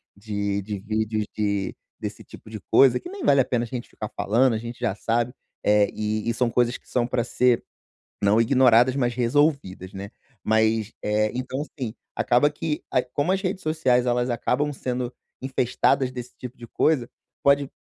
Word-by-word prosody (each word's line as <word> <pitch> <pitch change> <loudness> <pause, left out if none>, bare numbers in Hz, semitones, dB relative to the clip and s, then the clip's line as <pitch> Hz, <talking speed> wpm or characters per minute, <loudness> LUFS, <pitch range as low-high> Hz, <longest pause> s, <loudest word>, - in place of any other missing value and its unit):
de 100 -1 -2
de 105 0 -5
vídeos 110 +1 -1
de 100 -2 -1 0.2
desse - - -6
tipo - - -14
de 110 -1 -7
coisa, 135 -3 +6
que 350 - -9
nem 395 -2 -7
vale 140 -1 +5
a - - 0
pena 120 -2 0
a - - -5
gente 120 +1 -6
ficar 105 - -7
falando. 115 +5 +2
A - - 0
gente 120 +2 -7
já 115 -5 -1
sabe, 115 +3 0 0.3
eh, 105 0 +4
e 110 0 -2
e 115 - +1
são 120 0 +1
coisas 120 +1 +1
que - - -26
são 120 -2 +1
pra 120 -1 0
ser 125 0 +2 0.6
não 105 +2 +4
ignoradas, 125 +1 +5
mas 120 -3 0
resolvidas, 120 - +1
né? 100 +2 -7 0.3
Mas, 110 0 +2
eh, 105 0 +1
então, 130 +2 -3
assim, 130 -7 -6 0.2
acaba 125 +4 +3
que 150 0 -3
a 125 - +3
como 145 +7 -1
as 195 0 +1
redes 190 0 -3
sociais, 130 -6 +2
elas 120 0 +1
acabam 125 +5 0
sendo 125 -2 -3 0.3
infestadas 130 0 +1
desse 125 -1 -8
tipo 125 0 -8
de 120 -2 -11
coisa, 130 -1 +1 0.3
pode 140 0 +4
120 Hz, 185 wpm, -24 LUFS, 110-130 Hz, 0.6 s, coisa